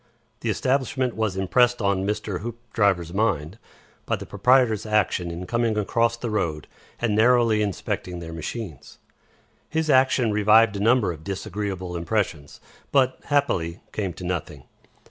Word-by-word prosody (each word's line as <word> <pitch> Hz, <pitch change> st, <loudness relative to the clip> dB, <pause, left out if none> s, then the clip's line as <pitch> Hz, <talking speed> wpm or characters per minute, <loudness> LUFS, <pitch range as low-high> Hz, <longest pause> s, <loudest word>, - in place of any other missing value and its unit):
The 115 Hz, -, -3 dB
establishment 130 Hz, +2 st, 0 dB
was 110 Hz, -4 st, -1 dB
impressed 120 Hz, +6 st, +3 dB
on 100 Hz, -2 st, 0 dB
Mr. 105 Hz, -3 st, -2 dB
Hoopdriver's 105 Hz, -7 st, -1 dB
mind 100 Hz, -3 st, -1 dB, 0.5 s
by -, -, +1 dB
the -, -, -8 dB
proprietor's 110 Hz, 0 st, +3 dB
action 105 Hz, -5 st, 0 dB
in 85 Hz, +2 st, -6 dB
coming 115 Hz, 0 st, 0 dB
across 115 Hz, +3 st, +1 dB
the 115 Hz, -1 st, -4 dB
road 80 Hz, -8 st, -2 dB, 0.3 s
and 115 Hz, -3 st, 0 dB
narrowly 115 Hz, -1 st, +4 dB
inspecting 90 Hz, -2 st, -3 dB
their 85 Hz, -1 st, -7 dB
machines. 80 Hz, -, -7 dB, 0.7 s
His 160 Hz, -1 st, 0 dB
action 130 Hz, -3 st, +3 dB
revived 105 Hz, +1 st, +4 dB
a -, -, -3 dB
number 115 Hz, -2 st, +3 dB
of 80 Hz, -2 st, -9 dB
disagreeable 95 Hz, -1 st, -4 dB
impressions, 85 Hz, -4 st, -2 dB, 0.3 s
but, 130 Hz, -2 st, +2 dB
happily, 90 Hz, -, 0 dB
came 100 Hz, -4 st, -2 dB
to 90 Hz, -, -10 dB
nothing. 85 Hz, -6 st, -4 dB
105 Hz, 140 wpm, -24 LUFS, 90-120 Hz, 0.7 s, narrowly